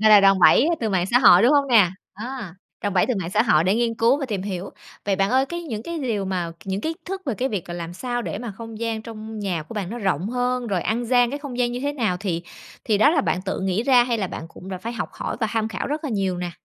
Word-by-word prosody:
Gọi 215 0 +5
là 210 -1 +9
đòn 195 -1 +5
bẩy 255 - +6
từ 225 - 0
mạng 185 -3 +1
xã 240 +5 +4
hội, 200 -7 +7
đúng 245 +5 +5
hông 285 -1 +4
nè? 210 -8 +6 0.2
Á. 220 -4 -6 0.3
Đòn 205 -2 -1
bẩy 180 - +3
từ 250 - 0
mạng 170 -1 -4
xã 210 +3 +3
hội 165 -9 +3
để 190 - +3
nghiên 230 0 +1
cứu 235 +5 +3
và 275 - -2
tìm 205 -6 -3
hiểu. 190 -1 -4 0.3
Vậy 195 -1 +1
bạn 195 +1 +1
ơi, 265 +2 +3
cái 345 +3 -5
những 225 -10 -5
cái 335 +6 -5
liều 230 -8 -1
mà, 180 -3 -2
c - - -23
những 195 0 -2
kiến 320 - -2
thức 385 +1 -4
về 260 - 0
cái 255 +5 -1
việc 200 -9 -4
là 175 - -5
làm 170 -1 -5
sao 245 +6 -3
để 205 - -4
mà 240 0 -5
không 225 +2 -9
gian 225 -1 -2
trong 220 -1 -8
nhà 185 -6 -2
của 160 - -11
bạn 195 -4 -3
nó 240 - -5
rộng 190 -3 -1
hơn, 250 0 -1
rồi 190 -6 -1
ăn 235 +2 -1
gian 245 0 +3
cái 285 - -4
không 280 -4 -7
gian 240 -1 +1
như 245 - -4
thế 285 +2 -1
nào 225 -10 0
thì 175 -5 -2 0.4
thì 215 -3 +2
đó 285 - +6
là 315 -2 +3
bạn 185 -8 -1
tự 195 0 -3
nghĩ 190 +3 0
ra, 245 -1 +5
hay 240 -2 -1
là 195 - -1
bạn 165 - -7
cũng 180 - -12
đã 185 -1 -4
phải 230 +6 -5
học 225 -3 -3
hỏi - - -4
và 225 - +2
tham 225 -1 0
khảo 220 - -4
rất 300 +3 -3
là 290 - -2
nhiều 195 -4 0
nè? 175 0 -3
220 Hz, 305 wpm, -23 LUFS, 190-245 Hz, 0.4 s, là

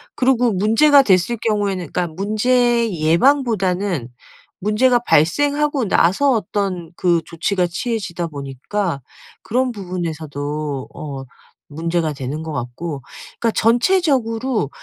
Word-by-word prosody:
그리고 250 -3 +2
문제가 225 +9 +5
됐을 190 +1 +2
경우에는 200 -6 -1
그러니까 180 - -1
문제 230 +6 +1
예방보다는 185 - +1 0.6
문제가 240 +4 +3
발생하고 285 - +2
나서 195 +11 +3
어떤 195 -6 -2
그 170 -2 +2
조치가 180 +2 -1
취해지다 175 -2 -3
보니까 140 +4 -4 0.4
그런 255 +2 0
부분에서도 155 - -4
어 140 -3 -7 0.4
문제가 165 +1 -2
되는 140 +3 -5
거 160 - -5
같고 140 +3 -5 0.4
그러니까 230 - +1
전체적으로 245 - +1
195 Hz, 285 characters per minute, -19 LUFS, 160-240 Hz, 0.6 s, 문제가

